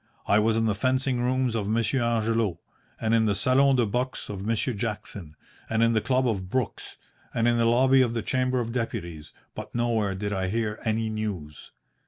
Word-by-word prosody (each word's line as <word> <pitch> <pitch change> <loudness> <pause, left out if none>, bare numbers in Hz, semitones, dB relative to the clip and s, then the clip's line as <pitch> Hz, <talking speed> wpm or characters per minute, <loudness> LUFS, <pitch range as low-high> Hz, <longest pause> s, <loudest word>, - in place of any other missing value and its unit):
I 100 - +4
was 110 +1 +2
in 115 - +1
the 110 - +2
fencing 130 +3 0
rooms 130 -1 +1
of 105 -3 -2
Monsieur 115 +3 +1
Angelo, 115 -4 0 0.4
and 110 0 0
in 110 -1 +3
the 100 - +1
salon 135 +5 +3
de 120 -2 +3
boxe 125 +5 -3
of 100 -2 -5
Monsieur 115 +3 0
Jackson, 100 -7 -5 0.3
and 110 0 +2
in 115 0 +3
the 110 - +2
club 130 +1 +1
of 95 -5 -2
Brooks, 130 0 -3 0.4
and 115 0 +2
in 120 0 +3
the 115 - +2
lobby 130 +3 +5
of 120 -2 +1
the 115 - -2
Chamber 130 0 0
of 115 -1 -3
Deputies, 85 -10 -4 0.2
but - - -8
nowhere 115 -4 0
did 100 +2 -3
I 95 -1 -1
hear 105 +1 -2
any 110 0 0
news. 100 -9 -5
115 Hz, 200 wpm, -26 LUFS, 105-125 Hz, 0.4 s, lobby